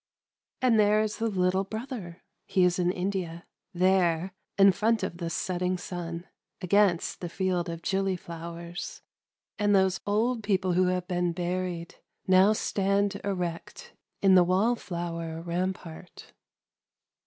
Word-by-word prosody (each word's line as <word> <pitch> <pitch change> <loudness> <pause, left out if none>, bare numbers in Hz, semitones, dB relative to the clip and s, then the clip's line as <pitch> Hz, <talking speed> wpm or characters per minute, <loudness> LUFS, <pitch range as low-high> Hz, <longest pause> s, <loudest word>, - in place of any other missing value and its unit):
— - - -59
And 235 -4 +4
there 210 +1 +4
is 215 -1 -3
the 230 - 0
little 185 -1 +1
brother 215 -4 -7
— - - -52
(he 185 - +2
is 180 0 +2
in 180 0 +2
India 180 -3 -3
!) - - -57
there, 180 -1 +2 0.2
in 195 0 +7
front 215 +2 +1
of 180 -2 -3
the 170 -1 -3
setting 180 +2 -1
sun, 175 -1 -6 0.3
against 185 -1 +2
the 175 - -4
field 180 -1 -1
of 165 0 -6
gilly 195 -1 0
flowers; 170 0 -7 0.3
— - - -36
and 205 -1 +3
those 190 -1 +3
old 225 +4 +1
people 190 -3 +1
who 180 +1 +3
have 180 -1 -1
been 175 -1 0
buried, 175 -1 -3 0.3
now 190 +2 +6
stand 200 -1 0
erect 195 - -4 0.3
in 195 -1 +6
the 180 -1 +7
wall 190 +7 +2
flower 170 -5 -5
rampart. 175 0 -5
185 Hz, 150 wpm, -28 LUFS, 175-200 Hz, 0.3 s, in